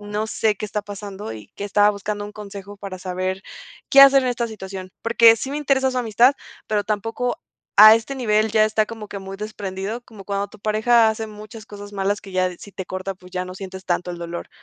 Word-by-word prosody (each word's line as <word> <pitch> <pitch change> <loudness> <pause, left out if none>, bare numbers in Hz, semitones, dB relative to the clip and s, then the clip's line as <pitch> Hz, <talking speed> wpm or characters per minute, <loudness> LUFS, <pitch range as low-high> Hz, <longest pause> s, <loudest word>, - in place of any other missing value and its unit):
"No 210 +1 -3
sé 220 -1 0
qué - - -5
está 210 0 -3
pasando", 200 - -7
y 105 -2 -11
que 200 - -5
estaba 205 +1 +4
buscando 205 0 -4
un 205 - -8
consejo 205 -1 -9
para 195 -2 -7
saber 185 +1 -3 0.5
qué 275 - +8
hacer 275 0 +7
en 255 - 0
esta 235 -1 -1
situación. 190 -3 -8
Porque 230 0 +6
sí 265 - -5
me 290 - -2
interesa 265 -2 +2
su 255 - -2
amistad, 240 +3 +4 0.3
pero 210 -1 0
tampoco 225 +4 -2 0.4
a 215 +1 +11
este 230 +5 -2
nivel. 220 -4 +1
Ya 215 -1 +5
está 215 0 +1
como 220 -2 -8
que 200 - -6
muy 195 0 -8
desprendido, 205 +1 -5
como 215 -5 -13
cuando 200 0 -2
tu 215 - -16
pareja 220 +2 +4
hace 220 0 -4
muchas 215 +1 -11
cosas 205 -1 -10
malas 200 +1 -1
que 195 - -11
ya 185 0 +2
de, 180 - -10
si 205 - -12
te 190 -1 -6
corta, 185 +1 -4
pues, 180 0 -17
ya 180 0 -2
no 185 0 -8
sientes 190 0 -8
tanto 175 0 -1
el 175 - -6
dolor. 170 0 -6
205 Hz, 230 wpm, -22 LUFS, 195-220 Hz, 0.5 s, a